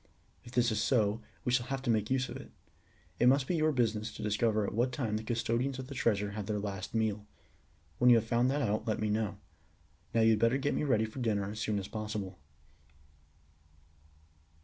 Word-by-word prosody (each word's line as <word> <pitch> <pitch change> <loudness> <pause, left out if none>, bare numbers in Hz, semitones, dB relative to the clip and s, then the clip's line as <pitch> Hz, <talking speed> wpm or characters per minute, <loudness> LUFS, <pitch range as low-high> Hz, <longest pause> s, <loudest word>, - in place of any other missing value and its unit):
If 120 - -13
this 120 -2 +3
is 110 - 0
so, 110 -3 +2 0.2
we 125 - +1
shall 120 0 +1
have 135 0 -3
to 120 - +2
make 110 -1 0
use 130 0 +1
of - - -7
it. - - -9 0.7
It 120 - +5
must 135 +1 +4
be 175 - -1
your 155 -1 +2
business 110 -5 0
to - - -6
discover 105 0 +1
at - - -4
what 120 +4 +1
time 120 -5 -2
the 110 - -2
custodians 120 +3 -1
of 130 0 -7
the - - -6
treasure 105 -5 0
have 105 -1 -5
their 105 - -1
last 100 0 -5
meal. 105 -2 0 0.7
When 125 - +6
you 120 - +8
have 115 -1 +2
found 120 +2 +2
that 145 +1 0
out 105 0 -1
let 110 - 0
me 110 -1 0
know. 110 -1 -1 0.8
Now 115 - +4
you 110 0 +6
had 110 - +2
better 115 +3 +3
get 145 +1 0
me - - -1
ready 120 -7 +2
for 110 +4 -8
dinner 105 -5 0
as 110 - -7
soon 110 -1 -1
as 100 -1 -4
possible." 105 -5 -5
115 Hz, 215 wpm, -32 LUFS, 105-125 Hz, 0.8 s, you